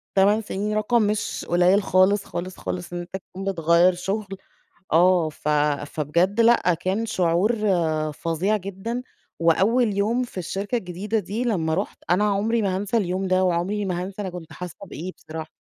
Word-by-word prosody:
تمان 205 Hz, +3 st, +4 dB
سنين، 210 Hz, +1 st, -3 dB
رقم 215 Hz, +3 st, +2 dB
مش 210 Hz, 0 st, -1 dB
قليل 180 Hz, +3 st, +4 dB
خالص، 195 Hz, +2 st, +3 dB
خالص، 185 Hz, +2 st, -6 dB
خالص، 175 Hz, -1 st, -5 dB
إن 175 Hz, -, -3 dB
أنت 175 Hz, +2 st, -7 dB
تكون 190 Hz, -, -9 dB
بتغيّر 170 Hz, +1 st, +4 dB
شغل، 195 Hz, +4 st, -3 dB, 0.7 s
آه 175 Hz, -1 st, +4 dB
ف 150 Hz, 0 st, -6 dB, 0.4 s
فبجد 170 Hz, +8 st, 0 dB
لأ، 230 Hz, -7 st, +4 dB
كان 190 Hz, +7 st, -2 dB
شعور 180 Hz, +4 st, +2 dB, 0.6 s
فظيع 170 Hz, +8 st, 0 dB
جدًا، 200 Hz, +5 st, -5 dB, 0.4 s
وأول 205 Hz, +7 st, +3 dB
يوم 230 Hz, +5 st, +1 dB
في 240 Hz, -6 st, -7 dB
الشركة 195 Hz, +6 st, -2 dB
الجديدة 195 Hz, +4 st, -3 dB
دي 215 Hz, +4 st, -3 dB
لمّا 165 Hz, -9 st, 0 dB
رُحت، 195 Hz, +4 st, -3 dB
أنا 195 Hz, +4 st, +3 dB
عمري 210 Hz, +3 st, +1 dB
ما 190 Hz, -2 st, 0 dB
هنسى 205 Hz, +4 st, -1 dB
اليوم 190 Hz, -2 st, 0 dB
ده، 185 Hz, 0 st, +3 dB
وعمري 185 Hz, +4 st, 0 dB
ما 180 Hz, -2 st, -2 dB
هنسى 195 Hz, +2 st, -6 dB
أنا 190 Hz, -, -4 dB
كنت 175 Hz, -2 st, -9 dB
حاسة 180 Hz, -3 st, -7 dB
بإيه 180 Hz, +5 st, -6 dB
بصراحة. 160 Hz, 0 st, -8 dB
190 Hz, 165 wpm, -24 LUFS, 175-210 Hz, 0.7 s, تمان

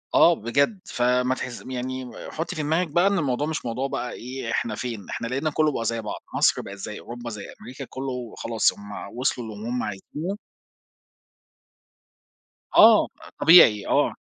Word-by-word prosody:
آه 170 Hz, -, +7 dB
بجد، 140 Hz, -, 0 dB
فما 125 Hz, +1 st, +1 dB
تحس 125 Hz, -2 st, -6 dB
يعني 130 Hz, 0 st, -4 dB, 0.2 s
حُطّي 160 Hz, +2 st, -4 dB
في 155 Hz, -, -2 dB
دماغِك 160 Hz, +4 st, +1 dB
بقى 175 Hz, +5 st, +3 dB
إن 200 Hz, 0 st, +2 dB
الموضوع 145 Hz, -1 st, 0 dB
مش 155 Hz, -4 st, -3 dB
موضوع 125 Hz, +3 st, -2 dB
بقى 125 Hz, -2 st, -4 dB
إيه 125 Hz, -1 st, -6 dB
إحنا 115 Hz, -2 st, -1 dB
فين، 115 Hz, -4 st, -5 dB
إحنا 115 Hz, -, -3 dB
لقينا 135 Hz, +5 st, -1 dB
كُلُّه 155 Hz, 0 st, +2 dB
بقى 115 Hz, -4 st, -3 dB
زي 115 Hz, 0 st, -1 dB
بعض، 105 Hz, -, -6 dB, 0.2 s
مصر -, -, +3 dB
بقِت 100 Hz, 0 st, -9 dB
زي 105 Hz, +2 st, -6 dB
أوروبا 120 Hz, 0 st, -7 dB
زي 105 Hz, -3 st, -7 dB, 0.2 s
أمريكا، 125 Hz, +2 st, -8 dB
كُلُّه 125 Hz, -3 st, -5 dB
خلاص، 115 Hz, -2 st, +1 dB
هم 100 Hz, +2 st, -9 dB
وصلوا 125 Hz, -2 st, -1 dB
للي 105 Hz, +3 st, -7 dB
هم 125 Hz, 0 st, -1 dB
عايزينُه. 150 Hz, -, -5 dB, 2.4 s
آه، 220 Hz, -1 st, +8 dB, 0.3 s
طبيعي، 115 Hz, -, +7 dB
آه. -, -, +2 dB
125 Hz, 165 wpm, -24 LUFS, 115-150 Hz, 2.4 s, آه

